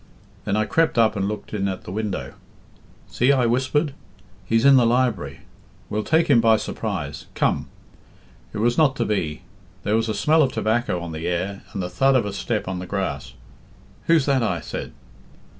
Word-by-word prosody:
Then 100 - 0
I 110 0 +1
crept 165 +3 +1
up 110 -1 +4
and 100 -1 -1
looked 105 +1 -6
in 100 -2 0
at 95 -1 -4
the - - -8
window. 105 -1 -3 0.7
'See,' 125 +3 +2
I 130 -3 +2
whispered, 130 +5 +1 0.5
'he's 115 +2 +2
in 140 0 +8
the 125 - +6
library. 115 - 0 0.5
We'll 105 +1 -1
take 160 +5 +2
him 125 -5 +5
by 110 -1 +5
surprise. 70 -8 -4
Come!' - - 0 0.8
It - - -7
was 120 +5 +1
not 145 -4 +4
to - - -1
be. 85 -6 -2 0.4
There 105 +2 +1
was 115 0 0
a 110 - -1
smell 155 +10 +3
of 135 -4 +2
tobacco 110 -4 0
on 85 -1 -6
the 80 +1 -4
air 95 +3 -2
and 95 - -3
the - - -2
thud 135 +10 +3
of 125 - +3
a 100 - -4
step 105 +1 -2
on 95 -1 -3
the 90 - -6
grass. 95 -9 -3 0.7
'Who's 165 -4 +4
that?' 135 -2 +2
I 90 -7 0
said. - - -6
110 Hz, 190 wpm, -23 LUFS, 95-130 Hz, 0.8 s, in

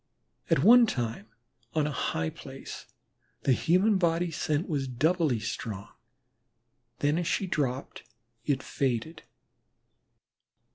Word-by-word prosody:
At - - +3
one 240 +1 +8
time 115 - -3 0.5
on 155 -2 +2
a 150 - -1
high 80 - -1
place - - -9 0.6
the - - +3
human 190 - +3
body 170 0 +1
scent 155 +1 -1
was 140 -5 -1
doubly 145 +1 +1
strong, 105 -1 -5 1.1
then 145 +3 +2
as 175 - -2
she 195 - 0
dropped 140 -7 -2 0.4
it 135 -1 0
faded. 135 +5 -2
150 Hz, 110 wpm, -28 LUFS, 125-170 Hz, 1.1 s, one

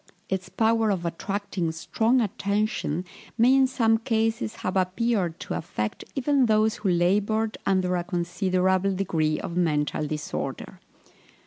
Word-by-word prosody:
Its 190 -1 -2
power 225 -1 +2
of 185 -4 -1
attracting 185 0 -2
strong 225 +9 +1
attention 200 -5 -1 0.3
may 245 +3 +5
in 270 -1 +5
some 225 -3 +2
cases 225 -1 -1
have 185 - -4
appeared 185 -2 0
to - - -5
affect 105 -10 -3
even 275 -1 +2
those 215 0 +2
who 210 -2 -1
laboured 205 +5 +1
under 185 -2 +2
a 175 - -1
considerable 185 +1 0
degree 160 -5 0
of 170 - -5
mental 150 -3 0
disorder. 150 0 -5
195 Hz, 130 wpm, -26 LUFS, 175-225 Hz, 0.3 s, may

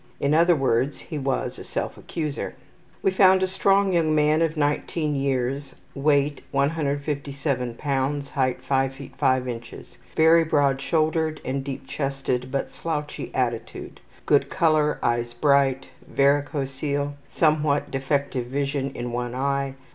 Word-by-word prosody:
In 140 +1 +1
other 170 +2 +5
words 135 0 +1
he 155 -3 -6
was 135 -1 -2
a - - -7
self - - -3
accuser. 150 -4 -4 0.5
We 195 - +3
found 190 0 +5
a - - +2
strong 195 +1 +2
young 160 -3 +2
man 150 +1 +3
of 165 -1 0
19 150 +1 0
years; 135 0 -1 0.2
weight 145 0 +1
157 140 -3 -1
lbs., 140 +1 -1
height 130 -2 -1
5 135 -1 +1
ft. 135 -1 -11
5 130 -2 +2
in. 120 -2 -3 0.6
Very 165 +1 +6
broad 140 -3 +2
shouldered 155 0 0
and 135 +1 -2
deep 135 -1 -6
chested, 135 -2 -2
but 140 - -2
slouchy 150 -3 -4
attitude. 120 -3 -3 0.2
Good 145 - +3
color. 155 -4 +2
Eyes 120 0 0
bright. 135 0 +3 0.3
Varicocele. 140 0 0 0.2
Somewhat 150 -2 +1
defective 135 -2 -1
vision 140 +1 -1
in 120 0 -4
one 120 0 -3
eye. 140 0 -1
140 Hz, 135 wpm, -24 LUFS, 135-155 Hz, 0.6 s, Very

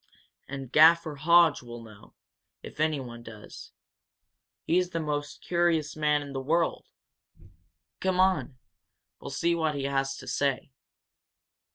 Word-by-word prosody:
And 135 -2 -7
Gaffer 160 +1 +5
Hodge 170 +1 +4
will 120 -1 -10
know, 110 -2 -16 0.5
if - - -11
anyone 135 -7 -2
does. 110 -3 -12 0.9
He's 180 +2 +1
the 170 -2 -3
most 145 -2 -4
curious 170 -3 0
man 150 -1 +1
in 140 -1 -9
the 135 - -3
world. 165 +5 0 1.1
Come 185 -1 -1
on 185 -8 +1 0.6
we'll - - -8
see 170 0 0
what 160 -3 -1
he 140 - -3
has 135 0 -1
to - - -11
say." 140 -1 -1
150 Hz, 130 wpm, -27 LUFS, 135-170 Hz, 1.1 s, Gaffer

